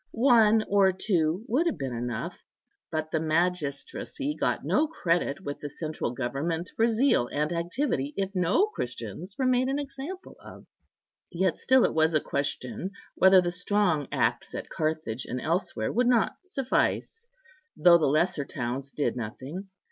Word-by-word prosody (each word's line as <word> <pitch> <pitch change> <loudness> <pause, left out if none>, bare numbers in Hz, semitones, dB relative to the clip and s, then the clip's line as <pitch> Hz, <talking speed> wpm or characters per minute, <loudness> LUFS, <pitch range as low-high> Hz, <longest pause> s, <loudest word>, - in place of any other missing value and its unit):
One 225 -3 +5
or 195 -1 +4
two 180 0 0
would 290 +10 +2
have 335 - -1
been 135 -4 -4
enough; 120 -1 -4 0.5
but 155 0 -3
the 160 - +1
magistracy 170 - -1
got - - -1
no 315 - +2
credit 175 - -1
with 145 -4 -5
the 145 - -6
central 155 -1 -4
government 145 +8 -3
for 225 - +3
zeal 230 - +3
and 150 +5 -1
activity 170 - -1
if 195 0 -1
no 185 - +3
Christians 125 - -6
were 265 - 0
made 255 0 +3
an 270 +1 0
example 285 +6 -7
of. - - -13 0.7
Yet 185 0 +1
still 260 0 +4
it - - 0
was 160 0 +3
a - - +5
question 140 +4 -3 0.2
whether 190 0 +6
the 175 -1 -1
strong 180 -5 +1
acts - - 0
at - - -6
Carthage 155 -7 -2
and 125 - -4
elsewhere 170 +8 -1
would 245 +2 +2
not 240 -2 +3
suffice, 375 - -1 0.5
though 170 +2 +7
the 155 - +2
lesser 155 +1 +2
towns 130 +1 -4
did 145 - -1
nothing. 130 - -6
175 Hz, 155 wpm, -27 LUFS, 145-225 Hz, 0.7 s, though